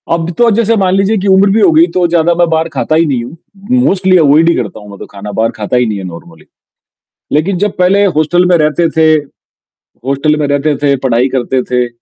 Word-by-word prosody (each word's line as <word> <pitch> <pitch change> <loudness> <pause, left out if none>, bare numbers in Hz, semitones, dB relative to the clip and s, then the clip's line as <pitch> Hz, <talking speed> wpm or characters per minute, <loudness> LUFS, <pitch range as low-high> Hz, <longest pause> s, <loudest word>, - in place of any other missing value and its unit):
अब 165 0 -1
तो 240 -1 +3
जैसे 230 +1 +1
मान 190 -2 0
लीजिए 195 +3 +1
कि - - -1
उम्र 195 +1 +4
भी 215 - +1
हो 330 - +4
गई 320 +1 +4
तो 180 -1 +2
ज़्यादा 170 0 +1
मैं 175 0 +1
बाहर 160 0 0
खाता 155 - -1
ही 165 +1 +2
नहीं 130 -6 -2
हूँ, 130 +8 -11 0.5
मोस्टली 185 -3 +2
अवॉयड 160 +1 +3
ही 170 - +1
करता 110 -3 -5
हूँ 105 -1 -14
मैं 100 - -11
तो - - -8
खाना 105 +1 -9
बाहर 110 +3 -1
खाता 110 +3 -2
ही 125 - +2
नहीं 110 -3 -3
है 95 - -7
नॉर्मली, 85 -2 -11 0.9
लेकिन 165 +6 0
जब 205 +1 -2
पहले 190 +3 +2
हॉस्टल 165 +4 +1
में 180 -1 +3
रहते 155 +2 +1
थे 160 0 +3 1.0
हॉस्टल 140 +3 0
में 150 - -1
रहते 145 +1 0
थे, 140 0 0
पढ़ाई 125 -1 0
करते 130 +1 -1
थे, 125 -1 -1
155 Hz, 230 wpm, -11 LUFS, 125-185 Hz, 1.0 s, उम्र